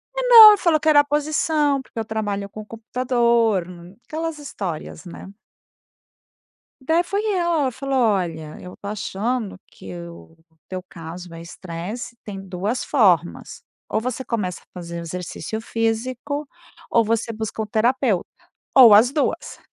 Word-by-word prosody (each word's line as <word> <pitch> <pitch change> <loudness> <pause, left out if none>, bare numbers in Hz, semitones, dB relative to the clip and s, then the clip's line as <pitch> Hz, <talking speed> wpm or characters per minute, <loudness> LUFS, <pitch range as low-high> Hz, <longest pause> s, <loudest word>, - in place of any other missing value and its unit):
Não, 480 -3 +10
ele 415 - +4
falou 335 -5 +2
que 315 - -4
era 290 -1 +6
posição 295 -1 0
porque 250 - -19
eu 220 - -3
trabalho 205 -2 -3
com 215 +1 -9
computador, 235 -3 +1 0.4
aquelas 325 0 -4
histórias, 190 - -6
né. 190 +3 -10 1.5
Daí 325 +6 +2
foi 400 +4 -2
ela, 345 -3 +1
ela 260 - 0
falou: 270 +2 -4
"Olha, 175 -9 -1
eu 180 0 -10
estou 200 - -8
achando 215 +1 -3
que - - -11
o 170 -1 -14 0.3
teu 185 -1 -6
caso 170 +1 -9
é 165 - -9
estresse, 180 +7 -7
tem 200 -2 -7
2 195 +5 -3
formas, 180 - +1 0.3
ou - - 0
você 255 +2 -4
começa 195 -7 -3
a - - -27
fazer 170 0 -6
exercício 180 +6 -6
físico, 245 +6 -2 0.4
ou 230 - +3
você 230 +1 -1
busca 220 0 -5
um 220 - -2
terapeuta, 225 -1 +1 0.5
ou 240 -6 +9
as 225 +5 +6
2". 290 0 -2
225 Hz, 145 wpm, -22 LUFS, 190-275 Hz, 1.5 s, Não